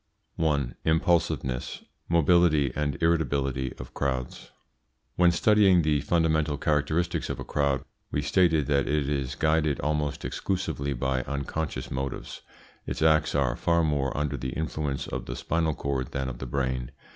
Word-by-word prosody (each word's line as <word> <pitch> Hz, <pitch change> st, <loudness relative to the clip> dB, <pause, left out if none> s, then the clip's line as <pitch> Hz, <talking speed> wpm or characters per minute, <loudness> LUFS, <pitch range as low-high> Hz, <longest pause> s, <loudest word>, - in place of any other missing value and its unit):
1. 70 Hz, -6 st, 0 dB
IMPULSIVENESS, 80 Hz, -6 st, 0 dB, 0.3 s
MOBILITY, 85 Hz, -4 st, +4 dB
AND 75 Hz, -1 st, -1 dB
IRRITABILITY 70 Hz, -6 st, +1 dB
OF 60 Hz, -, -9 dB
CROWDS. 65 Hz, -2 st, -3 dB, 0.7 s
When 90 Hz, -1 st, +5 dB
studying 95 Hz, 0 st, +4 dB
the 75 Hz, -2 st, +2 dB
fundamental 80 Hz, -3 st, +1 dB
characteristics 80 Hz, +3 st, 0 dB
of -, -, -3 dB
a -, -, -4 dB
crowd 70 Hz, -2 st, 0 dB, 0.2 s
we 75 Hz, -, -1 dB
stated 80 Hz, 0 st, +3 dB
that 70 Hz, -1 st, +1 dB
it 75 Hz, -1 st, +1 dB
is 70 Hz, -3 st, -2 dB
guided 80 Hz, -3 st, +1 dB
almost 75 Hz, 0 st, -1 dB
exclusively 70 Hz, -7 st, -2 dB
by 65 Hz, 0 st, -1 dB
unconscious 70 Hz, +2 st, -4 dB
motives. 65 Hz, -1 st, -4 dB, 0.5 s
Its -, -, -2 dB
acts 80 Hz, -2 st, +3 dB
are 65 Hz, -3 st, +1 dB
far 85 Hz, +4 st, +2 dB
more 70 Hz, -4 st, 0 dB
under 75 Hz, -1 st, -1 dB
the 65 Hz, +1 st, -4 dB
influence 75 Hz, -3 st, -2 dB
of -, -, -5 dB
the -, -, -4 dB
spinal 80 Hz, -1 st, 0 dB
cord 70 Hz, -3 st, -3 dB
than 65 Hz, -1 st, -2 dB
of -, -, -7 dB
the 65 Hz, -, -5 dB
brain. 65 Hz, -1 st, -2 dB
75 Hz, 145 wpm, -27 LUFS, 70-80 Hz, 0.7 s, When